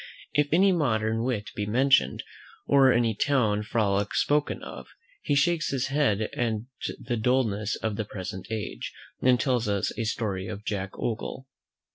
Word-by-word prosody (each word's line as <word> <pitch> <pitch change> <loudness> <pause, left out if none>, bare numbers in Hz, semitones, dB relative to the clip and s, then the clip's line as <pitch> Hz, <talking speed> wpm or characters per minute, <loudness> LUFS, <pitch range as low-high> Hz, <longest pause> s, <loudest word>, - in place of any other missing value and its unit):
If 145 0 +3
any 190 +5 +5
modern 110 -9 +1
wit 120 -5 -2
be 105 -1 -2
mentioned, 115 - +3 0.4
or 135 -2 +5
any 120 -2 +2
town 110 -3 +1
frolic 105 -2 0
spoken 145 0 +1
of, - - -8 0.3
he 145 - 0
shakes 160 +3 +2
his 135 -1 -1
head 135 -8 +2
at 115 +1 -1 0.5
the 120 - -3
dulness 110 -3 +1
of 110 -2 -3
the 110 - -2
present 95 -2 -7
age, 110 -2 -4 0.3
and 125 -1 +4
tells 125 -5 +1
us 100 -2 -1
a 115 - 0
story 100 -4 -2
of 105 +2 -7
Jack 100 -3 -3
Ogle. 120 +3 -4
115 Hz, 155 wpm, -27 LUFS, 105-135 Hz, 0.5 s, any